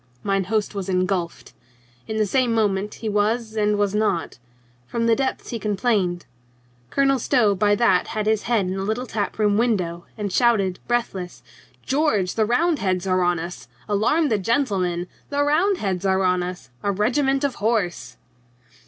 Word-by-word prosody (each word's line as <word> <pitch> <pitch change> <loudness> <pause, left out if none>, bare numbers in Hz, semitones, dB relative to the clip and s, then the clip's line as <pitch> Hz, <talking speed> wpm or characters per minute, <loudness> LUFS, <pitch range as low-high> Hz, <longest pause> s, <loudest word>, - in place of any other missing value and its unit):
Mine 195 -1 0
host 215 +2 -1
was 195 -2 -4
engulfed. 185 -2 -1 0.5
In 220 - -3
the 215 - +2
same 240 +2 +1
moment 205 -2 0
he 225 - -6
was 215 +2 0
and 210 -1 +1
was 205 -1 +1
not. 210 -10 -1 0.5
From 230 - -1
the 230 -1 +4
depths 265 +1 -2
he 230 - -4
complained. 200 -4 0 0.6
Colonel 275 - +2
Stow 220 -3 +3
by 205 +2 +2
that 200 -5 +3
had 215 -2 -3
his 215 -1 +2
head 225 -5 +2
in 185 - -2
at - - -4
the 190 - -2
little 220 +5 -2
tap 215 -4 -3
room 210 -1 +2
window 180 -8 -1
and 205 -3 -3
shouted 200 -7 +2
breathless: 190 - -2 0.4
"George, 260 - +1
the 220 - +1
Roundheads 240 - +1
are 185 -1 +2
on 175 0 +2
us! 170 +2 -7 0.2
Alarm 235 +10 +2
the 215 - +1
gentlemen! 190 -6 0 0.2
The 285 0 +1
Roundheads 295 - +1
are 190 0 +2
on 180 -1 +2
us! 180 -6 -6
A 205 - 0
regiment 270 +7 +1
of 280 -2 +1
horse 210 -5 -1
210 Hz, 170 wpm, -23 LUFS, 185-235 Hz, 0.6 s, the